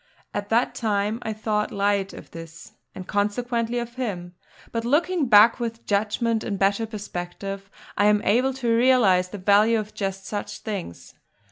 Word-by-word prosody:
At 205 0 -4
that 235 +3 +2
time 210 0 -1
I 220 - -3
thought 215 -1 -1
light 200 -1 0
of - - -12
this, 165 0 -11 0.2
and 185 - -7
consequently 230 +3 -1
of 240 0 -4
him; 180 -8 -4 0.4
but 230 0 -2
looking 310 +4 +1
back, 220 +1 +6
with 230 -1 -4
judgment 220 +2 0
in 200 -3 -3
better 200 +3 +1
perspective, 195 -1 -6 0.3
I 205 - +2
am 210 0 +3
able 250 +6 +2
to 240 -3 +1
realise 230 -7 +4
the 205 - -8
value 205 +4 +4
of 215 -1 -5
just 195 -1 -4
such 205 0 -5
things. 200 - -6
210 Hz, 160 wpm, -24 LUFS, 200-230 Hz, 0.4 s, back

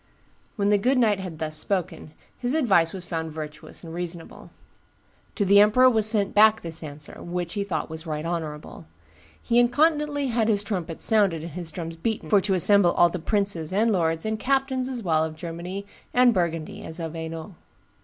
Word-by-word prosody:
When 200 -1 0
the 205 -1 +3
good 255 +6 +2
knight 215 -5 +3
had 185 -4 -7
thus 155 -1 -4
spoken, 170 -2 -3 0.2
his 250 +3 -2
advice 195 - +3
was 185 -2 -8
found 160 -2 -4
virtuous 155 +2 -8
and 165 -1 -9
reasonable. 170 -1 -6 0.9
To 205 - 0
the 200 +1 +6
emperor 250 +5 +6
was 220 -2 +4
sent 210 -3 +1
back 220 +1 +5
this 165 -1 -4
answer, 150 -1 -9
which 175 0 -4
he 200 - -2
thought 165 -5 -4 0.2
right 155 0 -4
honorable. 155 - -5 0.5
He 235 0 +1
incontinently 290 +2 +2
had 230 -2 +1
his 205 -2 +1
trumpets 180 -6 -3
sounded 200 -8 +3
and 170 - -7
his 170 0 -5
drums 165 0 -6
beaten 220 +6 -3
for 205 -2 +5
to 190 0 0
assemble 185 -1 +5
all 175 - +4
the 180 - -5
princes, 195 -3 -1
and 220 +4 +2
lords, 165 -3 0
and 220 0 -2
captains 265 0 0
as 245 -3 -4
well 160 -3 +2
of 160 0 -4
Germany 175 +4 -6 0.3
and 250 -1 +5
Burgundy 165 -4 -2
as 160 - -7
of 165 -1 -5
Hainault. 165 +3 -7
185 Hz, 185 wpm, -25 LUFS, 165-220 Hz, 0.9 s, the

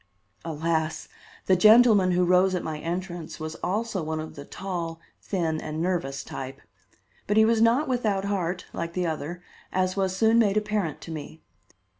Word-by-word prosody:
Alas! 160 0 -2 0.4
the 190 - +4
gentleman 215 -1 +6
who 180 0 +3
rose 185 +1 +4
at 180 - -2
my 155 -1 -4
entrance 175 0 -5
was 155 0 -4
also 205 +1 -1
one 155 0 -3
of 155 0 -6
the 140 - -9
tall, 170 -3 -5 0.2
thin 165 -5 -1
and 155 0 -5
nervous 165 -6 -1
type. 135 0 -7 0.7
But 205 - +1
he 220 - +7
was 225 0 +3
not 235 +7 +4
without 215 -6 0
heart, 180 -3 -2
like 170 0 -4
the 180 0 -1
other, 165 +2 -4 0.3
as 185 0 0
was 190 -1 0
soon 225 +3 +4
made 210 -2 +3
apparent 210 -7 -1
to 165 - -8
me. 155 +1 -8
180 Hz, 170 wpm, -26 LUFS, 160-200 Hz, 0.7 s, he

